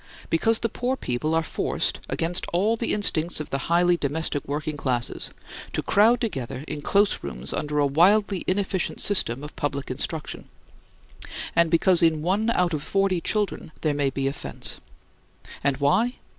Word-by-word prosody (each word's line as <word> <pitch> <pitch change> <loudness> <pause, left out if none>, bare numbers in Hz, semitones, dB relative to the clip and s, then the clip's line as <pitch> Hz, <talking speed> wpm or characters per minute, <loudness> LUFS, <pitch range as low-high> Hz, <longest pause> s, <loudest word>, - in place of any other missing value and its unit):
Because 225 +7 +3
the 230 - 0
poor 245 +3 -2
children 155 - -2
are 165 - +2
forced - - -1
(against 170 +2 -1
all 205 +6 +2
the 230 0 -1
instincts 175 -6 +1
of 155 - -6
the 135 0 -2
highly 175 +1 +4
domestic 145 0 -1
working 150 +2 -3
classes) 125 -4 -2 0.4
to - - -1
crowd 225 +4 +4
together 135 - -4
in 150 -1 -5
close 200 +7 +2
rooms 65 -1 -5
under 150 0 -2
a 145 - +4
wildly 190 +7 +3
inefficient 190 -1 -1
system 140 - +2
of 150 - -9
public 140 -2 -3
instruction; 150 +4 -4 1.1
and 170 -1 +4
because 170 +2 +4
in 160 -2 +3
one 200 +6 +1
out 180 -6 +1
of 155 - 0
the - - -10
forty 195 -3 +1
children 205 -5 -1
there 155 -2 +1
may 145 -1 +1
be 135 0 -3
offense. 135 +1 -3 0.8
And 140 -1 +2
why? 190 - +2
165 Hz, 165 wpm, -25 LUFS, 145-195 Hz, 1.1 s, highly